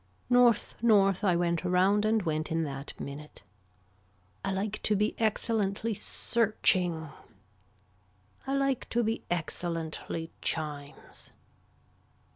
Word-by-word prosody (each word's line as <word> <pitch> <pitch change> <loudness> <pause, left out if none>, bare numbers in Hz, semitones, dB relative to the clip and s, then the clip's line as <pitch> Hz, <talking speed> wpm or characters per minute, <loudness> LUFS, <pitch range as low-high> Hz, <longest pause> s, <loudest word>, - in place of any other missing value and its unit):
North 245 -3 +3
north 200 -4 +4
I 185 -4 +3
went 170 0 0
around 190 +3 +3
and 220 -1 +2
went 155 -1 -2
in 165 0 +1
that 140 -2 -6
minute. 145 -1 -8 1.0
I 195 - -1
like 200 +2 -3
to 215 - +1
be 210 +2 +1
excellently 220 -1 0
searching. 185 -8 +1 1.4
I 270 - 0
like 275 -2 0
to 240 0 +1
be 225 +1 -2
excellently 165 -1 -3
chimes. 145 -3 -3
195 Hz, 105 wpm, -29 LUFS, 165-220 Hz, 1.4 s, north